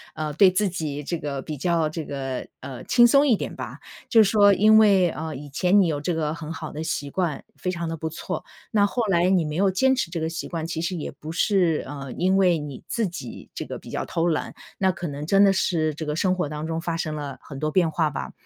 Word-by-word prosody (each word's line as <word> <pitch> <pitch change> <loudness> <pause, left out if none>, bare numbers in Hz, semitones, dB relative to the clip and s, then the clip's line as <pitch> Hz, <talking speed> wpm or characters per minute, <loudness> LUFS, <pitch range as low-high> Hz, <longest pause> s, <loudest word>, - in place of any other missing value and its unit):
呃 155 -1 -3
对 190 +4 +6
自 195 +2 +1
己 150 -4 -4
这 170 +4 -2
个 140 -2 -4
比 150 0 -6
较 165 0 +1
这 155 0 -5
个， 135 -2 -4
呃 130 -2 -7
轻 240 -1 +6
松 280 +4 +5
一 235 - +5
点 - - -5
吧。 - - -7 0.3
就 225 -2 +6
说 205 0 +5
因 215 +3 +6
为， 195 -5 +5
呃 160 -1 -5
以 145 +2 -8
前 180 +8 +2
你 180 - +3
有 150 -3 -1
这 170 +4 -1
个 155 -1 -1
很 165 0 -6
好 160 -1 -6
的 155 - -6
习 145 -3 -3
惯， 170 -3 -2
非 180 - -3
常 170 -2 -3
地 165 - -4
不 160 - -3
错， 160 - -5 0.3
那 205 -2 +4
后 240 +3 -1
来 175 -1 +3
你 185 -3 +3
没 150 +1 -4
有 195 0 +3
坚 265 +8 +3
持 260 - -1
这 165 -3 -4
个 160 - -1
习 165 - -5
惯， 165 -2 -4
其 165 -1 -4
实 180 +2 -2
也 155 - -4
不 155 +2 -8
是， 180 -4 +2
呃 135 -2 -7
因 190 +2 +2
为 180 -4 +4
你 145 -3 -7
自 230 -2 0
己 140 -8 -8
这 - - -5
个 - - -6
比 - - -13
较 - - -3
偷 165 0 -1
懒。 160 -3 -1 0.2
那 190 -1 +2
可 175 - -6
能 145 +1 -5
真 195 +4 +5
的 195 - +6
是 160 -5 +1
这 155 - -5
个 150 0 -2
生 185 +1 +2
活 180 -5 -1
当 150 +1 -5
中 165 0 -2
发 165 0 -3
生 155 -2 -3
了 145 -3 -5
很 140 -2 -9
多 155 - 0
变 170 -3 +2
化 155 -1 +1
吧。 140 - -5
165 Hz, 280 characters per minute, -24 LUFS, 150-190 Hz, 0.3 s, 对